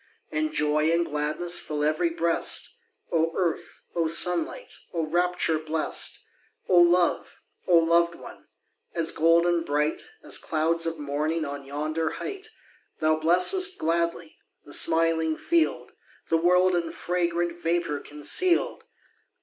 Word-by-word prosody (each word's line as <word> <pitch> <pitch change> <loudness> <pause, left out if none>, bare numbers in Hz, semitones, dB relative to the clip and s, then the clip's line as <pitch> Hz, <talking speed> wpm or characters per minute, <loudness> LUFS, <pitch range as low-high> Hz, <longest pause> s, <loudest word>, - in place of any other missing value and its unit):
And 310 0 -1
joy 155 - +1
and 170 +1 +1
gladness 155 +4 -1
Fill 150 -1 -4
ev'ry 155 +3 +1
breast! 165 0 -1 0.4
Oh 165 0 +1
earth! 175 -3 -3
oh 165 -2 +1
sunlight! 180 - 0 0.2
Oh 165 -1 0
rapture 175 -1 0
blest! 155 0 -2 0.4
Oh 180 -1 +5
love! 175 0 +2 0.3
oh 175 -2 +5
loved 170 +1 +3
one! - - -13 0.5
As 165 -1 0
golden 170 +1 +3
bright, 150 0 -1 0.2
As - - -1
clouds 165 +1 0
of 165 0 -3
morning 150 +2 -2
On 140 -1 -6
yonder 155 +3 -3
height! 400 +1 -7 0.5
Thou 155 0 +2
blessest 185 - +3
gladly 170 0 -2 0.3
The 145 - -5
smiling 160 -1 +3
field, 335 -1 0 0.4
The 165 - +4
world 180 +2 +3
in 170 -2 -1
fragrant 175 -1 -2
Vapour 165 -3 -1
conceal'd. 340 - 0
165 Hz, 125 wpm, -26 LUFS, 155-175 Hz, 0.5 s, Oh